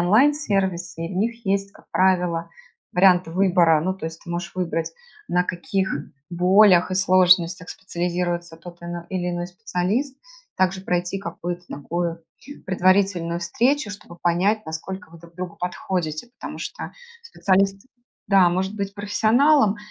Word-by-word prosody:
онлайн-сервисы 195 - +1
и 185 - -7
в - - -4
них 230 +2 -2
есть, 195 0 0
как - - -20
правило, 180 -3 +1 0.4
варианты 180 -2 +4
выбора. 175 -3 +4
Ну, 185 +3 -1
то 190 - -9
есть 165 0 -8
ты 170 - -9
можешь 170 0 -4
выбрать, 170 -3 -2 0.4
на 180 0 +2
каких 190 +2 -2 0.4
болях 180 +1 +5
и - - -1
сложностях 180 -1 +3
специализируется 175 -2 -3
тот 175 0 -12
ал 170 0 -6
или 180 -2 -2
иной 175 0 -3
специалист, 215 +8 -2 0.4
также 190 0 +1
пройти 180 +1 -1
какую-то 175 -1 -5
такую 170 +3 -3 0.4
предварительную 185 -2 +2
встречу, 235 - +1
чтобы 175 -4 -11
понять, 185 +4 +1
насколько 190 +5 -6
вы 170 - -13
друг 170 0 -16
другу 180 -1 -6
подходите. 180 0 -3
Потому - - -7
что - - -6 0.3
специалист, 195 - +1 0.5
да, 190 -3 +5
может 190 +3 -1
быть 200 0 -4
профессионалом, 215 +4 +3
180 Hz, 140 wpm, -23 LUFS, 175-195 Hz, 0.5 s, болях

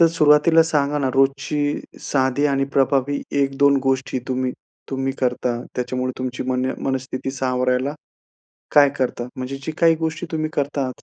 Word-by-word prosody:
तर 170 - +8
सुरुवातीला 150 +2 +5
सांगा 150 -2 0
ना, 135 -2 0
रोजची 140 +2 +1 0.2
साधी 135 +1 +1
आणि 135 -1 +1
प्रभावी 140 +1 +2 0.2
1-2 140 +1 +3
गोष्टी 135 -1 0
तुम्ही-तुम्ही 130 +1 -4
करता, 125 -1 0 0.2
त्याच्यामुळे 125 +1 -2
तुमची 130 -1 -3
मन 125 0 0 0.2
मनस्थिती 130 0 -3
सावरायला 130 +1 0 0.8
काय 145 -1 +8
करता? 125 -2 -2
म्हणजे 130 +2 -5
जी 160 - -3
काही 165 -1 +5
गोष्टी 160 +1 -3
तुम्ही 155 -1 -1
करता, 140 -2 -1
135 Hz, 135 wpm, -21 LUFS, 130-145 Hz, 0.8 s, तर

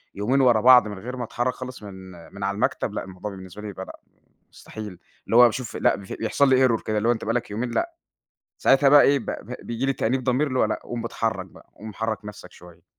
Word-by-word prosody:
يومين 125 +7 +1
ورا 120 -4 +4
بعض 125 -2 +7
من 105 -2 -7
غير 125 +4 -7
ما 125 - -3
اتحرّك 120 +2 -2
خالص 130 -3 -9
من 100 -1 -9 0.4
من 100 0 -7
على 100 0 -1
المكتب، 105 - -1
لأ - - -3
الموضوع 95 +2 -7
بالنسبة 95 +1 -10
لي 105 - -7
يبقى 95 -1 -7
لأ - - -12 0.5
مستحيل، 105 -5 -9 0.3
اللي 115 - 0
هو 125 - +9
باشوف 120 0 -1
لأ - - +2
بف 100 -1 -10
بيحصل 135 +5 +1
لي 130 0 +5
error 115 -2 0
كده 110 0 -1
اللي 110 +2 0
هو - - +5
أنت 115 - -4
بقى 115 - -1
لك 120 -2 -2
يومين 120 +4 -3
لأ، 340 - -2 0.6
ساعتها 135 +1 +4
بقى 145 +1 +8
إيه؟ 140 0 +4
ب - - -10
ب 125 - -6
بييجي 120 +3 -3
لي 135 - +1
تأنيب 130 +1 -1
ضمير 130 +4 +1
اللي 130 -2 -2
هو - - +4
لأ، - - -2
قوم 120 -1 -5
ب - - -6
اتحرّك 110 -5 -2
بقى، 85 - -18
قوم 110 0 -9
حرّك 110 0 -3
نفْسك 100 -3 -10
شوية. 85 -1 -16
115 Hz, 255 wpm, -24 LUFS, 105-125 Hz, 0.6 s, هو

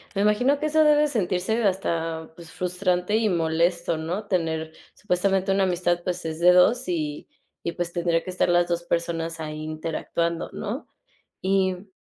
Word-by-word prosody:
me 200 - +2
imagino 245 +7 +3
que 305 - -2
eso 310 +1 +4
debe 300 0 +5
sentirse 220 -2 0
hasta, 165 -5 -1
pues, 170 -1 -12
frustrante 180 +2 0
y 220 -1 +2
molesto, 170 0 +1
¿no? 175 +7 -3
Tener 160 -4 -1 0.2
supuestamente 190 0 0
una 195 0 +2
amistad, 175 -1 +1
pues, 180 -1 -3
es 160 0 -4
de 180 +1 +7
2 230 +8 +4
y 155 -4 -3 0.4
y 170 - 0
pues 175 0 -4
tendría 170 -1 +1
que - - -6
estar 185 -1 +1
las 175 0 +3
2 170 0 -1
personas 165 -1 -2
ahí 155 -1 -5
interactuando, 165 +2 -2
¿no? 225 +8 -5 0.6
Y, 190 -1 +2
mm, 185 +3 -12
180 Hz, 170 wpm, -25 LUFS, 165-195 Hz, 0.6 s, de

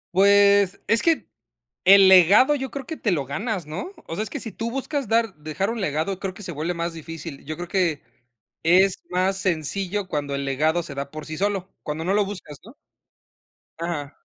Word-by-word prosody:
Pues 200 0 +5
es 230 - +3
que, 330 -2 +2 0.6
el 195 0 +8
legado 195 - +7
yo 265 -2 -4
creo 275 0 -6
que 320 - -6
te 210 - 0
lo 145 -5 -1
ganas, 190 - -3
¿no? 170 - -6
O 165 - -5
sea, 215 - -1
es - - -6
que 290 - -4
si 225 - -5
tú 230 +2 -4
buscas 270 +1 -3
dar 225 -2 +1
dejar 155 +6 -3
un 230 0 -3
legado, 180 +2 -1
creo 195 -2 -4
que 210 - -11
se 185 - -5
vuelve 160 +3 -3
más 170 0 -3
difícil. 165 -2 -8
Yo 155 +2 -4
creo 175 +1 -7
que 175 -7 0 0.6
es 185 +3 +4
más 185 +2 0
sencillo 190 +3 -2
cuando 145 -2 -2
el 140 - -3
legado 155 +5 +1
se 140 -4 -8
da 140 0 -5
por 155 -1 -8
sí 155 0 -6
solo, 195 -1 -1
cuando 155 +2 -4
no 185 +3 0
lo 205 0 +3
buscas, 180 -7 -8
¿no? 230 +6 -13 1.0
Ajá. 160 -4 -4
185 Hz, 205 wpm, -23 LUFS, 155-205 Hz, 1.0 s, el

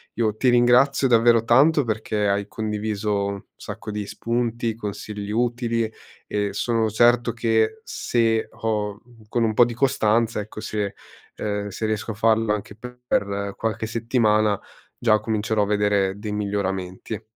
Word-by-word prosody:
io 110 -3 0
ti 130 - +1
ringrazio 125 +3 +4
davvero 115 -1 +5
tanto 145 +6 +5
perché 110 -2 -1
hai 100 0 0
condiviso 105 -1 -2
un 100 -1 -5
sacco 105 +1 -8
di 105 0 -4
spunti, 115 -1 -2
consigli 105 -1 -6
utili 115 0 0 0.4
e 105 -1 -1
sono 115 +1 0
certo 120 +2 +3
che 115 - +1
se 115 -2 0
ho, 105 -2 -2
mhmm 120 -2 -19
con 120 0 +1
un 110 - 0
po' 120 - +6
di 120 - -4
costanza, 115 -3 +1
ecco 105 +1 -9
se, 105 -2 -3 0.4
ehm 105 -1 -3
se 105 +3 -4
riesco 110 +1 -2
a - - -4
farlo 110 0 +2
anche 105 0 -5
per 125 +2 -10
per 100 0 -1
qualche 110 0 -2
settimana 110 -3 +2 0.4
già 110 -3 +3
comincerò 110 0 0
a - - +1
vedere 100 -1 +1
dei 105 0 -5
miglioramenti. 100 0 -3
110 Hz, 150 wpm, -23 LUFS, 105-115 Hz, 0.4 s, po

